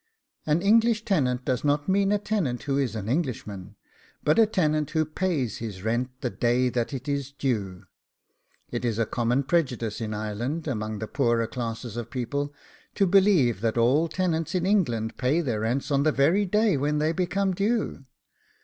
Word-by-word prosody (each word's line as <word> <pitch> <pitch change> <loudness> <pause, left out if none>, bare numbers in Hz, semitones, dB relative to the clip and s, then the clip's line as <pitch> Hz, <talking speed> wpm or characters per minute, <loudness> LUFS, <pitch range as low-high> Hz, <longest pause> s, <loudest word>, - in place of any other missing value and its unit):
An 155 +4 +2
English 225 +1 +3
tenant 130 -10 +1
does 125 -2 -1
not 145 0 +1
mean 195 +1 +2
a 210 - +3
tenant 195 - -2
who 140 -1 -1
is 135 -5 0
an 105 -2 -4
Englishman, 110 - -3 0.5
but 150 +8 +3
a 225 - +6
tenant 155 -7 +1
who 155 0 +1
pays 155 - -1
his 105 -5 -6
rent 120 +3 0
the 125 -4 -2
day 125 +1 +1
that 120 -1 -2
it 135 -1 -6
is 140 -1 -2
due. 105 -10 -2 0.9
It - - -3
is 115 -3 0
a 115 - +2
common 120 +4 0
prejudice 130 -9 -1
in 110 -1 -3
Ireland, 115 +10 -3
amongst 110 -5 -3
the 110 - -3
poorer 115 0 +1
classes 115 -1 -5
of 120 -1 -5
people, 140 +3 -3 0.4
to 200 - +3
believe 180 - +4
that 115 0 0
all 130 +8 +3
tenants 165 -1 -1
in 180 -1 +1
England 120 - +1
pay 135 +6 +1
their 125 -10 -1
rents 120 +7 -1
on 140 -1 +3
the 155 +2 +3
very 170 +9 +2
day 210 -3 +2
when 145 +2 0
they 155 +1 +1
become 190 +2 0
due. 205 - -1
140 Hz, 180 wpm, -26 LUFS, 115-170 Hz, 0.9 s, a